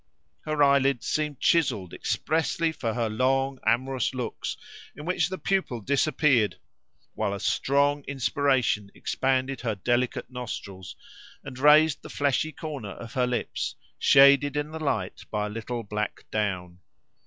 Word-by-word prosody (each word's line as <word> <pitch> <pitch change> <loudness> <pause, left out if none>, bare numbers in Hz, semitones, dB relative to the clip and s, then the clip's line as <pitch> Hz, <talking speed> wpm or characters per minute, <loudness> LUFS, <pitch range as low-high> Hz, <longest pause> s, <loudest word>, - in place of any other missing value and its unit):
Her 155 -1 +2
eyelids 140 -3 +3
seemed 150 -3 -1
chiselled 105 - +1
expressly 165 +1 0
for 115 -8 -3
her 120 -2 0
long 130 +4 0
amorous 130 +1 +1
looks 125 -2 -4 0.4
in 150 - -9
which 180 +1 +1
the 190 - -4
pupil 190 -13 -1
disappeared, 135 -1 +2 0.6
while 100 - -1
a - - -6
strong 140 +4 +1
inspiration 130 -5 +1
expanded 130 0 -1
her 115 -3 -1
delicate 120 +6 -1
nostrils 100 -7 -7 0.5
and 130 -2 -9
raised 150 +2 +5
the - - -10
fleshy 145 +2 0
corner 140 -12 -6
of 115 - -10
her 125 -1 +1
lips, 125 -1 -3 0.2
shaded 140 +1 +6
in 150 +1 -2
the 160 0 -6
light 105 -10 -2
by 105 -1 -1
a - - -4
little 115 +2 -4
black 105 0 -4
down. 90 -4 -2
130 Hz, 140 wpm, -26 LUFS, 115-145 Hz, 0.6 s, shaded